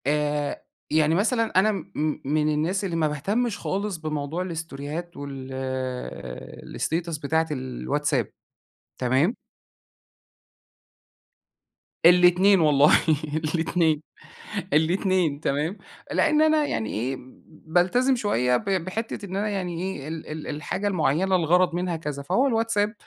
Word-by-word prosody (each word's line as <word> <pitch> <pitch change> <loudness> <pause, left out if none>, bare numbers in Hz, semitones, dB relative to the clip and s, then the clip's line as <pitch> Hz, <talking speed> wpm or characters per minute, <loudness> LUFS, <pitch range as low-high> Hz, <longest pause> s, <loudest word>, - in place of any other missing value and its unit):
آآ، 150 0 0 0.3
يعني 155 +1 +3
مثلًا 225 +1 +2
أنا 215 +3 +4
م 195 -6 -4 0.4
م 145 +3 +1
الناس 155 +6 +1
اللي 175 -3 -2
ما 160 -2 +2
باهتمش 205 - -1
خالص 200 -1 -2
بموضوع 155 +1 -3
الاستوريهات 165 -1 -5
وال 130 -2 -6
الstatus 165 -1 -1
بتاعة 160 +3 +1
الواتساب، 135 -1 -1 0.7
تمام؟ 130 - +2 2.7
الاتنين 180 +3 +6
والله 150 -2 +5 0.6
الاتنين. 160 -2 +1 0.7
الاتنين، 170 -1 +2
تمام؟ 155 +6 -1 0.3
لأن 305 -1 +3
أنا 310 -1 +4
يعني 110 - -2
إيه، 130 +5 -2 0.3
بالتزم 180 +11 +1
شوية 125 - +1
ب - - -8
بحتة 195 +4 -2
إن 190 -1 -6
أنا 205 +2 0
يعني 180 -4 -3
إيه 185 -7 -4
ال 160 0 -6
ال 155 0 -6
الحاجة 150 +7 -3
المعينة 180 +1 +2
الغرض 175 +1 +3
منها 175 -1 -1
كذا، 150 -3 -5
فهُو 255 - +2
الواتساب 225 -3 +1
165 Hz, 115 wpm, -25 LUFS, 145-190 Hz, 2.7 s, الاتنين